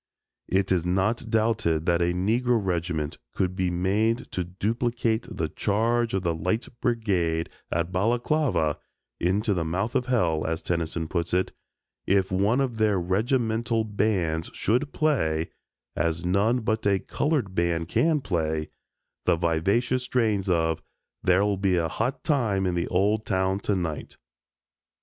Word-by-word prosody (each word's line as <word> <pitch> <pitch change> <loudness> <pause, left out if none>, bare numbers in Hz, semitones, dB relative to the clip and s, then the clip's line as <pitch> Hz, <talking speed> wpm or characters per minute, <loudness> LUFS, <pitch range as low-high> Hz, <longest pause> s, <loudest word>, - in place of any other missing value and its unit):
It 95 0 +1
is 90 -3 +2
not 95 +6 0
doubted 110 -8 +1
that 85 -1 +2
a 85 0 +2
Negro 115 +7 +1
regiment 85 -4 -2 0.2
could 90 -1 0
be 95 -1 0
made 100 +6 0
to 90 - -1
duplicate 115 +5 -1
the - - -2
"Charge 115 +2 0
of 95 - -1
the 85 -2 +1
Light 90 +9 -1
Brigade" 90 -8 0 0.2
at 85 +1 -1
Balaklava 115 - +1 0.4
"into 100 +5 +1
the 85 -3 -1
mouth 95 +8 -2
of 125 - 0
hell," 85 -11 +1
as 80 0 -2
Tennyson 85 -1 -2
puts 85 0 -1
it 95 - +1 0.6
if 95 -1 +2
one 100 +8 +2
of 125 -4 -1
their 105 -3 +2
regimental 115 +4 0
bands 95 -7 0
should 125 +7 0
play 80 - 0 0.4
as 85 +1 -1
none 105 +7 +2
but 110 -1 0
a 100 -1 +4
colored 135 - -1
band 85 -2 0
can 155 - +2
play 80 -7 -1 0.6
the - - +5
vivacious 100 +10 +1
strains 110 -6 0
of 80 -2 +1 0.4
"There'll 100 +2 +3
Be 95 -1 +2
a 85 -2 +1
Hot 130 - -2
Time 110 - +1
in 90 - 0
the 85 0 -1
Old 100 +4 +1
Town 95 -1 0
Tonight." 90 -7 -3
95 Hz, 145 wpm, -26 LUFS, 85-115 Hz, 0.6 s, the